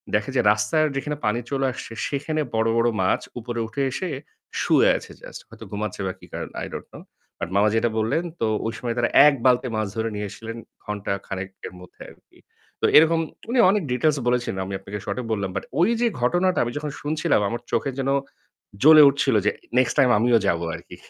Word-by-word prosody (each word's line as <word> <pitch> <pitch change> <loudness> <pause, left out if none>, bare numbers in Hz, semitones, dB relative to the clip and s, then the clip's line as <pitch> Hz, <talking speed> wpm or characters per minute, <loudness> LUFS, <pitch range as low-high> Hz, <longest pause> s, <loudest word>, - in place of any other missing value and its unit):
দেখে 105 +4 0
যে - - +5
রাস্তায় 155 +9 +1
যেখানে 150 +1 -3
পানি 105 +3 +1
চলে 135 -1 0
আসছে 115 - -8
সেখানে 155 +2 -2
বড়, 110 0 +2
বড় 120 +1 +3
মাছ - - +1 0.2
উপরে 120 0 -5
উঠে 140 +5 -4
এসে 185 +6 -3 0.5
শুয়ে - - +4
আছে - - -11
জাস্ট। - - -10
হয়তো - - -12
ঘুমাচ্ছে 105 -1 -4
বা 95 - -3
কি - - -14
কারণ - - -5 0.2
I - - -6
don't - - -7
know - - -11 0.4
but - - -4
মামা 105 +2 +4
যেটা 115 +1 +2
বললেন, 115 +10 0 0.2
তো 115 - +2 0.2
ওই 115 - -3
সময় 120 -1 -3
তারা 120 0 +1 0.2
১ 145 - +4
বালতি 125 0 +4
মাছ 110 -1 -1
ধরে 115 0 -1
নিয়ে 105 0 -3
এসছিলেন 115 +2 -8 0.3
ঘন্টা 105 -2 -3
খানেকের 95 -1 -7
মধ্যে 90 - -16
আরকি। - - -21 0.4
তো - - +3
এরকম 160 +2 +5 0.3
উনি 250 0 +1
অনেক 200 -2 +2
ডিটেইলস 145 +4 +2
বলেছিলেন, 120 -5 0
আমি 100 - -6
আপনাকে 105 +1 -7
শর্টে 125 - -3
বললাম। 100 -2 -2
বাট 95 - -3
ঐ - - +4 0.2
যে 240 - +4
ঘটনাটা 175 +8 +2
আমি 120 - -3
যখন 150 0 -4
শুনছিলাম 155 -4 +1
আমার 120 +1 -4
চোখে 125 +4 0
যেন 135 0 -1 0.7
জ্বলে 155 0 +9
উঠছিল 135 -3 +1
যে, - - +4 0.3
"নেক্সট 130 - +2
টাইম 130 -2 +5
আমিও 120 +1 +4
যাবো 85 -1 +1
আরকি।" - - -11
120 Hz, 200 wpm, -23 LUFS, 105-145 Hz, 0.7 s, জ্বলে